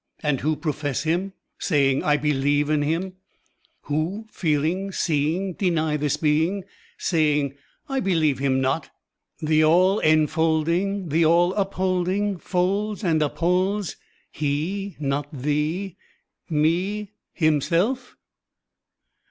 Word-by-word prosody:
And 150 -3 +1
who 155 +3 +1
profess 145 -4 -2
Him, 175 +5 -1 0.3
Saying: 140 -5 +2
I 150 0 +3
believe 145 0 +1
in 150 -1 +2
Him 160 +5 0
I 190 - -9 0.7
Who, 165 +9 -2
feeling, 170 +4 0
seeing, 170 +3 0
Deny 160 -5 0
this 150 0 0
being. 160 +6 +1 0.3
Saying: 150 -4 +1 0.3
I 270 -2 -1
beUeve 160 - +1
Him 135 -1 +1
not! 130 +5 -1 0.5
The 155 0 +3
All 185 +6 +4
enfolding. 160 +4 +1
The 160 +3 +3
All 170 +3 +4
upholding, 190 0 0
Folds 200 +5 -1
and 160 -4 +2
upholds 180 +6 0 0.4
He 165 +7 -2
not 145 0 -2
Thee, 150 +7 -2 0.5
me. 180 +7 0 0.2
Himself? 175 - +1
160 Hz, 110 wpm, -24 LUFS, 150-190 Hz, 0.7 s, All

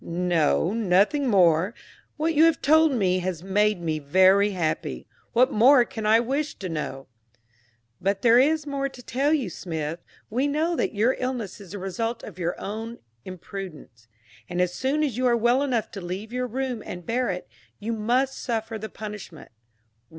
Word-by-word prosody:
"No; 170 0 +1
nothing 220 +6 +2
more. 185 -1 +3 0.4
What 320 +2 0
you 315 +1 +6
have 330 -2 +3
told 315 +2 +4
me 190 -7 +1
has 180 -2 -4
made 205 +1 +2
me 160 -2 -2
very 190 +7 +4
happy 170 -6 -3 0.3
what 250 +2 +4
more 245 +3 +6
can 220 -2 -5
I 220 +1 +6
wish 275 +5 -2
to 190 - -6
know?" 150 -5 -4 1.0
"But 195 +1 -1
there 235 0 +6
is 305 +3 +2
more 275 -1 -2
to 250 -2 -13
tell 275 +6 0
you, 290 -8 +1
Smith. 160 -2 -5 0.3
We 255 +6 0
know 305 +3 0
now - - 0
that - - -1
your 225 +5 +2
illness 245 -6 -4
is 195 -1 -11
the - - -4
result 225 +5 -3
of 185 -3 -10
your 175 0 -2
own 225 +3 -5 0.3
imprudence; 175 - -9 0.4
and 175 0 -3
as 180 -1 +1
soon 275 +8 0
as 265 -7 -1
you 255 0 +2
are 240 -1 +3
well 240 +3 +3
enough 250 -6 -1
to 195 - -7
leave 190 +6 -6
your 250 0 -1
room 255 -1 -3
and 175 -1 -8
bear 245 +4 0
it, 180 -1 -4 0.3
you 225 +3 -3
must 245 +5 0
suffer 225 -2 -3
the 220 +1 -6
punishment." 210 -6 -9
215 Hz, 180 wpm, -25 LUFS, 180-255 Hz, 1.0 s, you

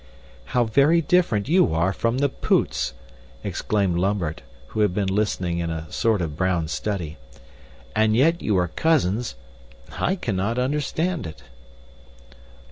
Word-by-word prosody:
"How 120 - +5
very 140 +9 +4
different 165 - +2
you 160 - +3
are 85 +4 +2
from 115 +5 0
the 140 +1 +3
Poots!" - - 0 0.5
exclaimed 100 -5 0
Lambert, 90 -4 -1 0.3
who - - -4
had 105 -4 +2
been 95 -2 0
listening 95 -4 0
in 85 -1 -2
a 80 -1 -5
sort 110 -5 +1
of 75 -3 -4
brown 90 -2 0
study. 85 -6 -3 0.8
"And 110 0 +3
yet 165 +8 +3
you 105 -3 +1
are 90 -1 +2
cousins 120 - +1 0.6
I 190 - 0
cannot 110 - -2
understand 150 - -1
it." 75 -4 -11
105 Hz, 135 wpm, -23 LUFS, 90-130 Hz, 0.8 s, How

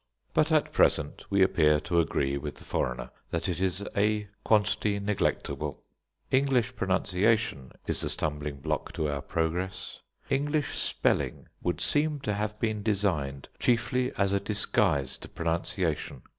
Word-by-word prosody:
But 155 +1 +3
at 155 -2 +3
present 75 -1 +2
we 100 -1 +4
appear 75 -5 +4
to 85 +3 +1
agree 70 -4 +1
with 75 +1 -4
the - - -12
foreigner 60 0 -2 0.2
that 85 +1 -2
it 90 -1 -2
is 95 +1 0
a 105 +1 +2 0.2
quantity 105 -1 +2
neglectable. 100 0 -1 0.5
English 130 -2 +2
pronunciation 95 - +1
is - - +1
the - - 0
stumbling 75 -2 -2
block - - -2
to 80 - -1
our 70 -1 -2
progress. 90 +5 -2 0.3
English 145 +2 0
spelling - - 0
would 90 - -1
seem 150 0 +2
to 105 - -1
have 105 +1 -2
been 110 -2 0
designed 90 -11 0
chiefly 125 +1 +2
as 100 0 +2
a 100 - +3
disguise 100 - +1
to - - -10
pronunciation. 80 -4 -2
95 Hz, 145 wpm, -29 LUFS, 80-110 Hz, 0.5 s, we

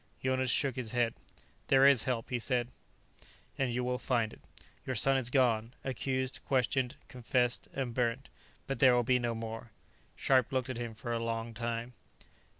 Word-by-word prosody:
Jonas 130 0 +1
shook 135 0 +1
his 120 -4 -4
head. 120 -2 +1 0.5
"There 135 0 +5
is 140 -4 +6
help," 125 -1 -2
he 125 - 0
said, 120 0 0 0.9
"and 130 -2 0
you 125 +1 -1
will 125 0 -1
find 115 -4 0
it. - - -15 0.4
Your 130 - -3
son 135 +5 +5
is 130 -3 0
gone; 120 -3 +1
accused, 130 0 -2
questioned, 130 -1 +1
confessed 125 0 0
and 130 -3 -3
burnt. 125 +2 -1 0.4
But 135 - -4
there 130 -2 +6
will 120 - +3
be 125 +1 +3
no 120 -1 -1
more." 115 +1 -6 0.5
Scharpe 130 -1 +3
looked 130 -1 -1
at 125 - -5
him 120 -2 -5
for 120 +2 -4
a 115 - -1
long 115 0 -3
time. 120 +1 -4
125 Hz, 175 wpm, -32 LUFS, 115-130 Hz, 0.9 s, is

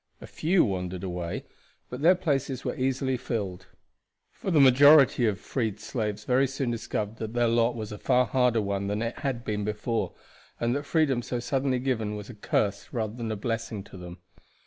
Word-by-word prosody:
A - - -9
few 175 +3 +2
wandered 90 -2 -3
away, 90 -2 -4 0.5
but 125 +2 -6
their 175 +4 +6
places 140 -7 -1
were - - -2
easily 130 0 0
filled; 100 -7 -4 0.6
for - - -5
the 165 -5 +4
majority 135 -1 +7
of 105 - +1
the - - -20
freed 110 -6 -2
slaves 105 -2 -3
very 130 +4 +3
soon 130 -1 -2
discovered 110 -1 -3
that 110 0 -5
their 120 -1 +3
lot 115 +1 +2
was 110 -2 -5
a 105 - -7
far 125 0 +3
harder 120 -1 +2
one 100 0 -2
than 105 +3 -1
it 115 +1 -4
had 130 -4 -3
been 105 -1 -2
before, 105 +2 -2 0.4
and 120 +2 +1
that 145 0 -4
freedom 145 -7 +2
so 120 +1 -3
suddenly 130 +1 0
given 115 -5 -1
was 105 +2 -7
a - - -11
curse 100 -1 -1
rather 110 -3 -2
than 115 -2 -4
a - - -1
blessing 115 -1 -3
to 100 - -14
them. 90 -1 -9
115 Hz, 195 wpm, -27 LUFS, 105-130 Hz, 0.6 s, majority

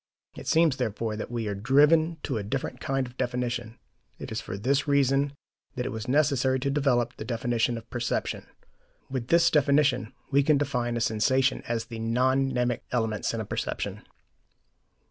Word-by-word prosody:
It - - -9
seems, 160 -4 +3
therefore, 110 -2 -2
that 105 - -5
we 115 -2 -3
are 100 - -1
driven 150 +9 +4
to 130 -6 -2
a - - -4
different 125 +3 -3
kind 135 0 -1
of 125 0 -12
definition. 120 -2 -2 0.4
It - - -8
is - - -3
for 95 - -6
this 135 +8 +1
reason 140 0 +2 0.4
that 125 - -2
it - - -3
was 110 0 -5
necessary 135 -2 +2
to 140 0 0
develop 135 -4 +1
the - - -5
definition 120 0 0
of 115 - -10
perception. 120 0 -2 0.6
With 130 -3 -3
this 170 +2 +4
definition, 140 -5 +3 0.2
we 140 - +5
can 145 +1 +3
define 125 -4 -1
a - - -2
sensation 130 +3 +2
as 115 -1 -1
the 115 -1 -8
non 130 +4 +1
mnemic 125 -1 0
elements 110 -4 0
in 115 - -2
a - - -5
perception. - - -3
125 Hz, 175 wpm, -27 LUFS, 115-140 Hz, 0.6 s, we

